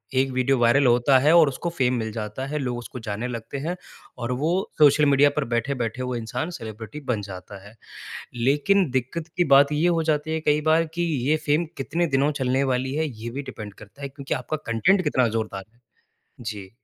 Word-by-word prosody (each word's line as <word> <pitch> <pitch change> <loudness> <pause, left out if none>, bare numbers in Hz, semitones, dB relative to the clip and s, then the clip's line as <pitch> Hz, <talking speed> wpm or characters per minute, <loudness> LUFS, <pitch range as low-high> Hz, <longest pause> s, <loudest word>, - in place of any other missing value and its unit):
एक 135 +1 +2
video 130 +1 +1
viral 120 +4 +4
होता 120 +3 +4
है 150 +4 +4
और 165 -3 +7
उसको 170 +6 -4
फ़ेम 130 -1 +2
मिल 110 -1 -3
जाता 110 +4 -4
है 150 +1 -3
लोग 125 -3 -2
उसको 120 +1 -8
जाने 105 +4 -3
लगते 120 +2 -6
हैं 175 +2 -1 0.4
और 120 0 -3
वो 160 +3 +1 0.3
सोशल 150 0 +6
मीडिया 140 0 +5
पर 150 - +2
बैठे-बैठे 120 -1 -1
वो 125 -1 -3
इंसान 120 +9 -3
सेलिब्रिटी 110 +5 -8
बन 105 -3 -1
जाता 95 +1 -9
है। 110 - -16 0.6
लेकिन 145 +8 +2
दिक्कत 130 +6 -2
की 175 - +4
बात 140 +2 +6
ये 160 +4 +2
हो 165 -2 +2
जाती 150 +2 -2
है 160 - -1
कई 150 -1 +2
बार 165 +1 +4
कि 175 - -1 0.3
ये 155 - +4
फ़ेम 155 +4 +3
कितने 170 +5 -1
दिनों 140 +2 +2
चलने 130 +2 +1
वाली 130 +2 -1
है 155 0 0
ये 115 -1 -7
भी 140 +4 -5
डिपेंड 105 -6 -8
करता 105 +7 -15
है 140 - -3
क्योंकि 135 0 -4
आपका 130 +5 -3 0.2
कंटेंट 185 - +3
कितना 130 -5 +2
ज़ोरदार 105 -3 -3
है। 120 - -31 0.6
जी। 105 -4 -6
130 Hz, 205 wpm, -24 LUFS, 115-150 Hz, 0.6 s, और